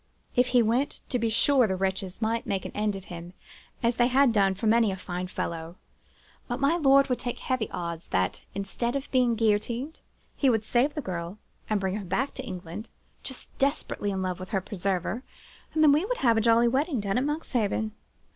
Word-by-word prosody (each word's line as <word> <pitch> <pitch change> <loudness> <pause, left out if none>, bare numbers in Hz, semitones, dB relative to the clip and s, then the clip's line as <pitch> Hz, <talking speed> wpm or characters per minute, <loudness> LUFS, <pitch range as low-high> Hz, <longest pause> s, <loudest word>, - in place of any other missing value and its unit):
If 250 0 +4
he 245 -1 +4
went, 245 +6 0
to 250 - 0
be 230 0 +1
sure, 255 +2 +4
the 190 - 0
wretches 190 +2 -2
might 230 +1 0
make 195 -1 -1
an - - -5
end 210 -1 0
of 195 - -7
him, 170 +1 -8 0.5
as 235 0 +2
they 240 - +4
had 260 -1 +4
done 195 -3 +3
of 190 - -13
many 225 -1 +4
a - - -3
fine 180 -1 -5
fellow: 165 -2 -4 0.7
but 245 +1 -3
my 280 +4 +3
lord 275 -4 +5
would 250 -2 0
take 245 - -3
heavy 255 -5 -1
odds, 170 -1 -5
that, 95 0 0
instead 200 +5 -2
of 275 0 -4
being 250 -3 +3
guillotined, 230 +6 0 0.4
he 275 - +3
would 220 -3 +1
save 255 +6 +2
the 300 - -2
girl, 175 -2 -5 0.3
and 215 -1 +2
bring 190 +1 -1
her 195 -4 -7
safe 270 +9 0
to - - -6
England, 180 +4 -7 0.3
just 265 -2 -8
desperately 275 -6 0
in 190 -1 -2
love 185 -1 -2
with 185 - -7
her 195 - +1
preserver, 190 +3 -2 0.5
and 315 - +4
then 300 - +8
we 300 +4 +4
would - - -1
have 235 -3 +3
a 225 - +3
jolly 230 +1 +5
wedding 270 +2 +1
down 200 +3 0
at - - 0
Monkshaven. 240 -8 -1
225 Hz, 210 wpm, -27 LUFS, 190-255 Hz, 0.7 s, then